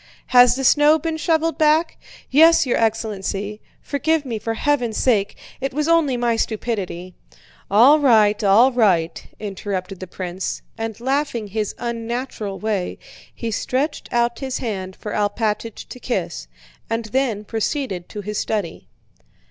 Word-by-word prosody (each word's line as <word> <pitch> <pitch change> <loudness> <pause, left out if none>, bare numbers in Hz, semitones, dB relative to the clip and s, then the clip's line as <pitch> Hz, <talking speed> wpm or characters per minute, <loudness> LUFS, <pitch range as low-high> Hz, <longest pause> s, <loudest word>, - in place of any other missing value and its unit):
"Has 245 0 +7
the 270 - -3
snow 295 +4 +5
been 320 +1 -3
shoveled 325 0 0
back?" 310 +2 +3 0.4
"Yes, 320 +3 +6
your 250 - +1
excellency. 210 -2 -2 0.2
Forgive 310 +1 0
me 230 -4 -3
for 225 +1 -3
heaven's 245 -4 0
sake... 205 -6 +1 0.2
It 270 0 -3
was 300 +1 0
only 325 -6 +3
my 235 -1 +1
stupidity." 200 -6 -3 0.6
"All 245 +10 +6
right, 215 -7 +4
all 215 +7 +5
right," 180 -9 +1 0.2
interrupted 195 -2 -5
the 185 - -7
prince, 185 +1 -5
and 225 -1 -5
laughing 260 -4 -1
his 215 0 -3
unnatural 235 -3 -4
way, 210 -4 -2 0.3
he 230 -1 -5
stretched 265 +7 -2
out 235 0 +1
his 265 -2 -3
hand 190 -5 -4
for 210 - -7
Alpátych 210 +1 -2
to 250 - -9
kiss, 175 - -3 0.4
and 225 0 -2
then 225 -2 -1
proceeded 220 - -3
to 210 - -6
his 210 +1 -4
study. 200 -7 -3
225 Hz, 140 wpm, -21 LUFS, 205-265 Hz, 0.6 s, Has